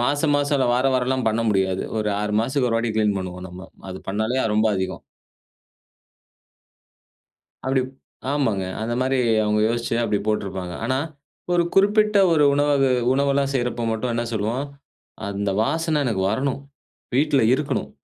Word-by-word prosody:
மாச 145 Hz, +4 st, +1 dB
மாசம் 145 Hz, 0 st, +1 dB
இல்ல 130 Hz, -, +2 dB
வார 125 Hz, +2 st, +2 dB
வாரம்லாம் 130 Hz, 0 st, 0 dB
பண்ண 110 Hz, +1 st, 0 dB
முடியாது. 95 Hz, -2 st, 0 dB, 0.2 s
ஒரு 105 Hz, -1 st, -1 dB
6 105 Hz, 0 st, -2 dB
மாசத்துக்கு 130 Hz, +2 st, 0 dB
ஒரு 115 Hz, -, +1 dB
வாட்டி 115 Hz, -1 st, -1 dB
க்ளீன் 105 Hz, -2 st, +2 dB
பண்ணுவோம் 90 Hz, -1 st, -6 dB
நம்ம. 90 Hz, +2 st, -10 dB, 0.2 s
அது 95 Hz, -, -6 dB
பண்ணாலே 110 Hz, +6 st, 0 dB
அது 110 Hz, -, 0 dB
ரொம்ப 110 Hz, -, +3 dB
அதிகம். 95 Hz, 0 st, -3 dB, 2.6 s
அப்பிடி, 130 Hz, 0 st, +1 dB, 0.5 s
ஆமாங்க 115 Hz, -10 st, 0 dB, 0.2 s
அந்த 115 Hz, +2 st, -2 dB
மாரி 130 Hz, +1 st, +1 dB, 0.3 s
அவங்க 105 Hz, 0 st, +1 dB
யோசிச்சி 115 Hz, 0 st, -1 dB
அப்பிடி 105 Hz, -3 st, 0 dB
போட்டிருப்பாங்க. 95 Hz, -4 st, -2 dB
ஆனா, 130 Hz, +2 st, 0 dB, 0.5 s
ஒரு 175 Hz, -1 st, +4 dB
குறிப்பிட்ட 210 Hz, +1 st, +4 dB
ஒரு 150 Hz, -2 st, +4 dB
உணவகு 145 Hz, -2 st, +2 dB, 0.2 s
உணவெல்லாம் 140 Hz, 0 st, +1 dB
செய்றப்ப 120 Hz, -2 st, -1 dB
மட்டும் 115 Hz, +2 st, -2 dB
என்ன 120 Hz, 0 st, -1 dB
சொல்லுவோம், 115 Hz, +5 st, -1 dB, 0.6 s
"அந்த 100 Hz, 0 st, -2 dB
வாசனை 160 Hz, +2 st, 0 dB
எனக்கு 100 Hz, -5 st, 0 dB
வரணும். 135 Hz, +5 st, -1 dB, 0.5 s
வீட்ல 140 Hz, 0 st, +3 dB
இருக்கணும்". 145 Hz, +1 st, -2 dB
120 Hz, 145 wpm, -22 LUFS, 105-140 Hz, 2.6 s, ஒரு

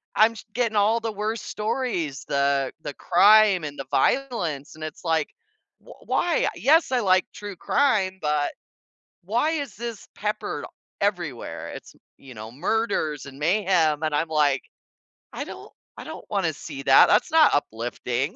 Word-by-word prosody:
I'm 220 Hz, +2 st, +5 dB
j -, -, -10 dB
getting 230 Hz, -3 st, 0 dB
all 215 Hz, +3 st, +3 dB
the 225 Hz, -1 st, -3 dB
worst 215 Hz, +2 st, -3 dB
stories, 210 Hz, -, -2 dB
the 140 Hz, -1 st, +1 dB
the 145 Hz, -, -5 dB
crime 210 Hz, +1 st, +5 dB
and 145 Hz, -1 st, -6 dB
the 135 Hz, -, -5 dB
violence, 165 Hz, -, 0 dB
and 155 Hz, -, -9 dB
it's 155 Hz, +2 st, -7 dB
like, 160 Hz, -3 st, 0 dB, 0.5 s
"W -, -, -14 dB
why? 345 Hz, -2 st, +1 dB
Yes, 310 Hz, +2 st, +3 dB
I 255 Hz, -, +2 dB
like 185 Hz, -4 st, +3 dB
true 205 Hz, -1 st, -8 dB
crime, 195 Hz, -5 st, +1 dB
but 150 Hz, -1 st, 0 dB, 0.7 s
why 235 Hz, -, +1 dB
is 285 Hz, -8 st, -4 dB
this 230 Hz, 0 st, -7 dB
peppered 210 Hz, 0 st, -3 dB, 0.4 s
everywhere?" 175 Hz, -, -3 dB
it's, -, -, -10 dB, 0.2 s
you 135 Hz, -2 st, -13 dB
know, 110 Hz, +1 st, -8 dB
murders 155 Hz, -, -1 dB
and 135 Hz, 0 st, -11 dB
mayhem, 165 Hz, -3 st, +2 dB
and 155 Hz, -1 st, -1 dB
I'm 160 Hz, +2 st, 0 dB
like, 145 Hz, -3 st, +2 dB, 0.7 s
"I -, -, -4 dB
don't -, -, -10 dB, 0.3 s
I -, -, -7 dB
don't -, -, -9 dB
wanna -, -, +1 dB
see -, -, -8 dB
that, -, -, +7 dB
that's -, -, +3 dB
not 320 Hz, -2 st, +6 dB
uplifting." 125 Hz, -, -2 dB
185 Hz, 155 wpm, -24 LUFS, 145-225 Hz, 0.7 s, that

